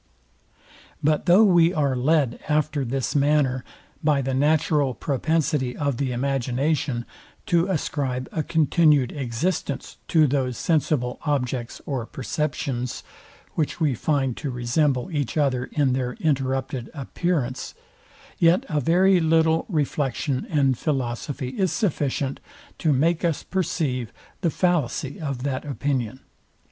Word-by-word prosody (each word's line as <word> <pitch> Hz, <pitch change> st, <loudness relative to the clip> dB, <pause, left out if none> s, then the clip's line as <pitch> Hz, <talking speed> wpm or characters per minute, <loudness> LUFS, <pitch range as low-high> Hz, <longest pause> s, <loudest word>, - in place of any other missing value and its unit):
But 150 Hz, +3 st, +1 dB
though 180 Hz, +5 st, +7 dB
we 175 Hz, -3 st, +5 dB
are 140 Hz, -4 st, +1 dB
led 135 Hz, -1 st, +2 dB
after 150 Hz, -1 st, +1 dB
this 130 Hz, +3 st, -2 dB
manner, 140 Hz, -3 st, +2 dB, 0.4 s
by 145 Hz, -3 st, +2 dB
the 135 Hz, +1 st, -1 dB
natural 145 Hz, -1 st, +2 dB
propensity 145 Hz, -1 st, 0 dB
of 140 Hz, -4 st, -1 dB
the 135 Hz, -1 st, -1 dB
imagination, 130 Hz, 0 st, -1 dB, 0.4 s
to 175 Hz, -4 st, +2 dB
ascribe 140 Hz, -7 st, -2 dB
a 160 Hz, -, -1 dB
continued 150 Hz, -3 st, +3 dB
existence 140 Hz, +3 st, -3 dB
to 160 Hz, -2 st, +4 dB
those 130 Hz, -3 st, 0 dB
sensible 150 Hz, -6 st, 0 dB
objects 125 Hz, -5 st, -2 dB
or 130 Hz, -5 st, -3 dB
perceptions, 130 Hz, -2 st, -3 dB, 0.5 s
which 155 Hz, +1 st, -1 dB
we 155 Hz, -5 st, +2 dB
find 135 Hz, 0 st, 0 dB
to 145 Hz, -, -4 dB
resemble 125 Hz, +5 st, 0 dB
each 145 Hz, -2 st, -2 dB
other 130 Hz, -4 st, +1 dB
in 140 Hz, -3 st, +1 dB
their 125 Hz, -1 st, -1 dB
interrupted 135 Hz, -4 st, -1 dB
appearance; 140 Hz, -2 st, -2 dB, 0.6 s
yet 170 Hz, +2 st, +4 dB
a 150 Hz, -, +1 dB
very 185 Hz, +4 st, +4 dB
little 160 Hz, 0 st, +3 dB
reflection 145 Hz, -, -1 dB
and 135 Hz, -5 st, +2 dB
philosophy 130 Hz, -1 st, -2 dB
is 185 Hz, +5 st, 0 dB
sufficient 145 Hz, -, -1 dB, 0.4 s
to 160 Hz, -, +2 dB
make 160 Hz, +6 st, +2 dB
us 165 Hz, -4 st, 0 dB
perceive 150 Hz, -, -1 dB, 0.3 s
the 170 Hz, -, +2 dB
fallacy 155 Hz, -5 st, 0 dB
of 135 Hz, -5 st, -3 dB
that 135 Hz, -2 st, -2 dB
opinion. 135 Hz, -4 st, -2 dB
145 Hz, 125 wpm, -24 LUFS, 130-160 Hz, 0.6 s, though